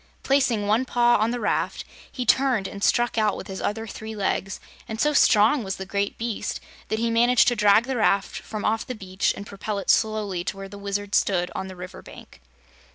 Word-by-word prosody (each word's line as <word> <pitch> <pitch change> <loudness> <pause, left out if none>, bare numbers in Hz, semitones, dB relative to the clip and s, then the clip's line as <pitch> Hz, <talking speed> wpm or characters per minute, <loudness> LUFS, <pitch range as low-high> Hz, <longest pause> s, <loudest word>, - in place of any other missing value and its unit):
Placing 260 -6 +2
one 215 +5 +2
paw 240 -1 +3
on 220 +2 +1
the 245 +1 -2
raft, 210 - -1 0.3
he 250 - -4
turned 250 -4 +2
and 200 +1 -8
struck 240 -1 +2
out 215 -2 +1
with - - -7
his 190 -1 -7
other 225 +2 -2
three 220 0 -8
legs 195 -1 -2 0.3
and 220 0 -6
so 300 +3 +2
strong 230 0 +4
was 190 -1 -3
the 190 - -7
great 200 +1 -2
beast 230 -2 -3 0.3
that 220 - -1
he 230 +1 0
managed 240 +2 +4
to 245 - -1
drag 210 0 +5
the 260 0 -3
raft 200 -3 +1
from 215 -1 -6
off 225 +1 +1
the 255 - -6
beach 190 -3 -1
and 200 - -7
propel 200 +1 -5
it 195 - +2
slowly 215 -5 0
to 195 - -3
where 195 0 -7
the 200 +1 -10
Wizard 200 0 -4
stood 180 -3 +1
on 190 - -4
the 190 - -9
river 180 +1 -9
bank. - - -14
215 Hz, 220 wpm, -24 LUFS, 200-235 Hz, 0.3 s, drag